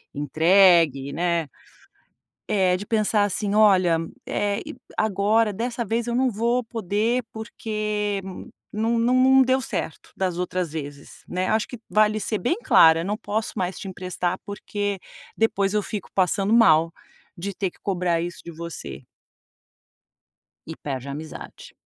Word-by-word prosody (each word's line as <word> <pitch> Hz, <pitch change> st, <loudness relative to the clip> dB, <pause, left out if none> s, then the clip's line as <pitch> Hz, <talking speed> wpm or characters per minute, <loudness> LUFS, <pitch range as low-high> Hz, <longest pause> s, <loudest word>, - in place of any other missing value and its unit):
entregue, 160 Hz, -2 st, +4 dB
né 170 Hz, -2 st, 0 dB, 1.0 s
eh 190 Hz, -3 st, +3 dB
de 205 Hz, -, -7 dB
pensar 215 Hz, -1 st, +2 dB
assim: 205 Hz, +1 st, -1 dB
"Olha, 185 Hz, -6 st, +5 dB, 0.3 s
eh, 205 Hz, 0 st, -1 dB, 0.4 s
agora 215 Hz, +1 st, +2 dB
dessa 235 Hz, +2 st, -3 dB
vez 230 Hz, +3 st, -1 dB
eu 235 Hz, -, -1 dB
não 260 Hz, 0 st, +2 dB
vou 235 Hz, +3 st, 0 dB
poder, 225 Hz, +2 st, -1 dB
porque 210 Hz, -2 st, -3 dB, 0.5 s
não 225 Hz, +2 st, 0 dB
não 240 Hz, +2 st, +2 dB
não 265 Hz, +1 st, +6 dB
deu 260 Hz, +1 st, +3 dB
certo 165 Hz, -, -5 dB
das 185 Hz, -2 st, -1 dB
outras 180 Hz, -2 st, -2 dB
vezes", 145 Hz, -2 st, -8 dB
né, 185 Hz, +1 st, -2 dB
acho 220 Hz, 0 st, +1 dB
que 245 Hz, -, -9 dB
vale 215 Hz, 0 st, +3 dB
ser 210 Hz, +1 st, -2 dB
bem 335 Hz, -, 0 dB
clara, 160 Hz, 0 st, +6 dB
"eu -, -, -4 dB
não 210 Hz, +2 st, -2 dB
posso 215 Hz, +1 st, -3 dB
mais 185 Hz, -2 st, -2 dB
te 195 Hz, -, -7 dB
emprestar, 185 Hz, -1 st, -3 dB
porque 205 Hz, -1 st, -3 dB, 0.4 s
depois 200 Hz, -3 st, +1 dB
eu 210 Hz, -, +2 dB
fico 210 Hz, -4 st, -6 dB
passando 195 Hz, +3 st, +1 dB
mal, 165 Hz, -8 st, +5 dB, 0.5 s
de 200 Hz, +3 st, -4 dB
ter 195 Hz, -3 st, -1 dB
que -, -, -26 dB
cobrar 175 Hz, -3 st, 0 dB
isso 175 Hz, 0 st, -5 dB
de 170 Hz, -, -8 dB
você". 170 Hz, +1 st, -8 dB, 1.6 s
E 160 Hz, -, -7 dB
perde 135 Hz, -2 st, -5 dB
a -, -, -4 dB
amizade. 155 Hz, +2 st, -9 dB
200 Hz, 150 wpm, -24 LUFS, 175-220 Hz, 1.6 s, não